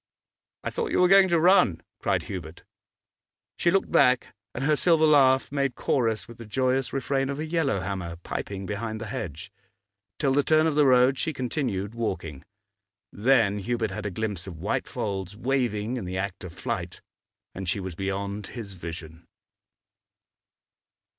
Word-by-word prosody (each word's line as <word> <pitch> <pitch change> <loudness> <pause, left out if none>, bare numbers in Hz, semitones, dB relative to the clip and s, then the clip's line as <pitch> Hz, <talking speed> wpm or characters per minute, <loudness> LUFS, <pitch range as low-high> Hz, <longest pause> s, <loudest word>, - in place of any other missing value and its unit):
'I - - -1
thought 465 -2 -2
you - - +2
were 180 - +6
going 195 0 +7
to 170 -1 +3
run,' 170 - +5 0.2
cried - - 0
Hubert. 85 -3 -7 0.9
She 170 - +2
looked 195 +2 +1
back, 125 -2 +3 0.2
and 130 - -3
her 150 +2 +3
silver 160 0 +4
laugh 135 -4 +4
made 140 -2 0
chorus 115 -5 0
with 120 0 -13
the 115 - -8
joyous 130 +3 0
refrain 135 0 -1
of 140 - -3
a 155 - -3
yellow 155 - 0
hammer, 90 -3 -4
piping 100 -1 -5
behind 110 +2 -4
the 115 - -5
hedge. 85 -8 -6 0.7
Till 135 -3 +1
the 145 - +4
turn 155 +2 +3
of 160 - +2
the 145 -1 +4
road 130 +1 +5
she 160 - -1
continued 120 -7 -2
walking, 95 -11 -4 0.7
then 110 -2 +3
Hubert 115 0 -1
had 105 +2 -4
a - - -1
glimpse 100 -2 -3
of 85 -4 -7
white - - -2
folds 100 -1 -4
waving 120 -2 -1
in 110 - -5
the 90 +1 -4
act 95 -1 -4
of 90 - -7
flight, - - -5 0.5
and 95 -2 -5
she 100 - 0
was 95 -2 -5
beyond 100 +2 -3
his 110 -5 -7
vision. 85 -2 -8
115 Hz, 165 wpm, -26 LUFS, 95-135 Hz, 0.9 s, going